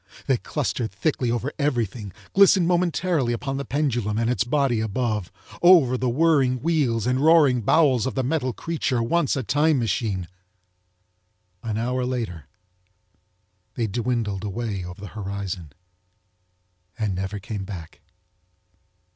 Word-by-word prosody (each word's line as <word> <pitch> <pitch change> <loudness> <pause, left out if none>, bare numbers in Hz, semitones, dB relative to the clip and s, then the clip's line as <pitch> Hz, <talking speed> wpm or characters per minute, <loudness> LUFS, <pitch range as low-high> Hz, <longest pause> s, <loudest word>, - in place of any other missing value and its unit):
They 135 -3 +2
clustered 120 -4 -3
thickly 125 +3 -1
over 120 +4 -2
everything, 120 -7 -1 0.2
glistened 195 -3 +5
momentarily 175 -6 +1
upon 135 +3 -3
the 140 - -4
pendulum 120 -7 -1
and 115 +1 +1
its 125 - +1
body 130 -2 +1
above, 110 -3 -2 0.3
over 170 -8 +6
the 125 0 0
whirling 135 -2 +2
wheels 135 -8 +1
and 125 +1 +1
roaring 145 -5 +5
bowels 130 -1 +3
of 130 - -4
the 130 - 0
metal 130 -1 0
creature 135 -4 -2
once 160 +5 +1
a 135 - -2
Time 150 +5 +2
Machine. 105 -6 -1 1.3
An 110 -2 -3
hour 125 +3 -1
later 115 - -4 1.3
they 120 - 0
dwindled 110 -2 -2
away 105 -2 -3
over 90 +1 -9
the 105 -1 -8
horizon 100 -5 -5 1.3
and 105 -3 -1
never 95 +2 -3
came 100 0 -5
back. 90 -7 -9
120 Hz, 130 wpm, -24 LUFS, 105-140 Hz, 1.3 s, over